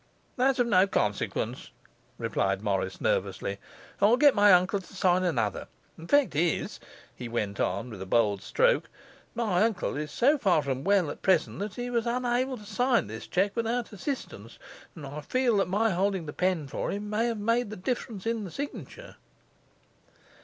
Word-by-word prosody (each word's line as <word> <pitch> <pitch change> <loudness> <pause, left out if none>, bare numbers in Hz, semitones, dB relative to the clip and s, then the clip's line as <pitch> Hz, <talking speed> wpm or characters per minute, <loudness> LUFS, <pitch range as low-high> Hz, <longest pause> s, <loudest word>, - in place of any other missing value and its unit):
'That's 265 +1 +2
of 245 - +3
no 195 -4 +4
consequence,' - - -2 0.5
replied - - -1
Morris - - -1
nervously. - - -1 0.4
'I'll 215 +5 +5
get 285 0 +6
my 205 -1 +6
uncle 185 +2 +4
to 185 +1 -16
sign 185 -1 +2
another. 120 - -1 0.3
The 165 - -11
fact 285 - +3
is,' 165 +1 0 0.4
he 120 -2 -7
went 105 -4 -3
on, 100 +7 -1
with 100 -4 -8
a 95 - -6
bold 105 -2 +2
stroke, - - +2 0.5
'my 215 -6 +1
uncle 215 -8 0
is 150 +1 -3
so 285 +5 +3
far 180 - +3
from 135 -1 -3
well 195 -5 +2
at - - -10
present 180 -3 +2
that 205 0 -4
he 245 0 -4
was 235 -1 0
unable 250 +2 0
to 210 - -13
sign 245 +4 +1
this 110 +2 -8
cheque 195 +2 0
without 230 0 -2
assistance, 265 +8 -6 0.4
and 155 -4 -8
I 145 +2 -6
fear 255 - +1
that 195 - +2
my 215 +4 +2
holding 190 -1 0
the 150 - -6
pen 180 -5 0
for - - -3
him 205 +1 -4
may 215 +3 0
have 230 -2 -2
made 230 +2 0
the 215 - -6
difference 215 -1 -4
in 230 -1 -1
the 190 - -6
signature. 285 - -7
205 Hz, 180 wpm, -28 LUFS, 165-240 Hz, 0.5 s, get